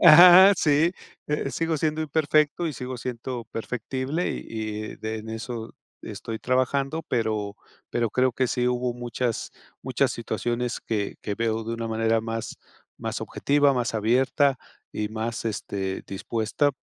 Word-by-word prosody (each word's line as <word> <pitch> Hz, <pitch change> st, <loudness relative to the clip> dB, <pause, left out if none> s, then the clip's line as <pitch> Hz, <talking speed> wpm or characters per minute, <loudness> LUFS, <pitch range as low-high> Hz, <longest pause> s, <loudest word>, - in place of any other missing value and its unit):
Ajá, 180 Hz, +4 st, +10 dB
sí, 155 Hz, +4 st, +3 dB, 0.3 s
eh, 150 Hz, -2 st, -1 dB
sigo 165 Hz, +5 st, 0 dB
siendo 155 Hz, +1 st, 0 dB
imperfecto 155 Hz, +2 st, +2 dB
y 155 Hz, -, -2 dB
sigo 125 Hz, -1 st, -5 dB
siendo 120 Hz, 0 st, -5 dB
perfectible, 130 Hz, +7 st, -2 dB
y -, -, -4 dB, 0.5 s
y -, -, -12 dB
de 110 Hz, 0 st, -4 dB
en 110 Hz, +1 st, -9 dB
eso 115 Hz, 0 st, -5 dB, 0.3 s
estoy 110 Hz, -1 st, -6 dB
trabajando, 135 Hz, +5 st, 0 dB
pero 110 Hz, -3 st, -1 dB, 0.3 s
pero 115 Hz, -3 st, 0 dB
creo 130 Hz, +1 st, +2 dB
que 130 Hz, 0 st, 0 dB
sí 125 Hz, 0 st, 0 dB
hubo 125 Hz, 0 st, 0 dB
muchas 120 Hz, -1 st, -3 dB, 0.3 s
muchas -, -, +1 dB
situaciones 120 Hz, 0 st, -2 dB
que 105 Hz, -3 st, -2 dB
que 105 Hz, -, -2 dB
veo 115 Hz, -1 st, 0 dB
de 115 Hz, +1 st, -3 dB
una 115 Hz, 0 st, -4 dB
manera 115 Hz, 0 st, +1 dB
más 115 Hz, 0 st, -5 dB, 0.4 s
más -, -, -3 dB
objetiva, 145 Hz, 0 st, +2 dB
más 120 Hz, -3 st, -1 dB
abierta 130 Hz, +5 st, +2 dB, 0.3 s
y 105 Hz, 0 st, -2 dB
más, 110 Hz, +2 st, -3 dB
este, 100 Hz, -3 st, -3 dB
dispuesta, 110 Hz, +8 st, 0 dB
120 Hz, 145 wpm, -25 LUFS, 115-140 Hz, 0.5 s, Ajá